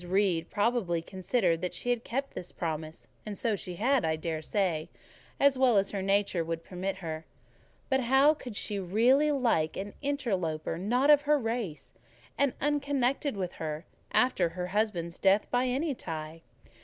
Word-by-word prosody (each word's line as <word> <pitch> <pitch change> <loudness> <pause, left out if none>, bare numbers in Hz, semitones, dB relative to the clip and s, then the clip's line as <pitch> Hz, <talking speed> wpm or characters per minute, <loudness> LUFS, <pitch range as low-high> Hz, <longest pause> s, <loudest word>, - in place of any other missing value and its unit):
Reed 180 -2 +1
probably 205 -6 +1
considered 185 -2 0
she 245 - -1
had 240 -1 -1
kept 270 +4 -3
this 180 - -6
promise; 160 -1 -5 0.2
and 210 -2 -6
so 225 +1 0
she 180 -2 -6
had, 255 +7 +2
I 160 -1 +1
dare 160 0 -3
say, 170 -3 -1 0.5
as 275 -2 +4
well 250 -5 +5
as 195 0 +2
her 200 - -2
nature 195 -2 +1
would 165 0 -4
permit 185 +2 -4
her; 160 0 -4 0.6
but 265 - +2
how 265 +4 +5
could 250 -7 -9
she 205 0 -2
really 240 +11 +3
like 235 - +1
an 200 +1 -5
interloper 190 - -1
not 250 +9 +3
of 295 -1 +7
her 300 - +6
race, 225 - -4 0.4
and 280 -2 +1
unconnected 280 -3 0
with 180 -2 -3
her, 155 +1 -4 0.3
after 190 -9 +3
her 180 +1 -5
husband's 185 -6 -1
death, 195 +2 +4
by 245 +1 +2
any 280 +4 0
tie? 160 -6 -6
200 Hz, 165 wpm, -29 LUFS, 170-255 Hz, 0.6 s, of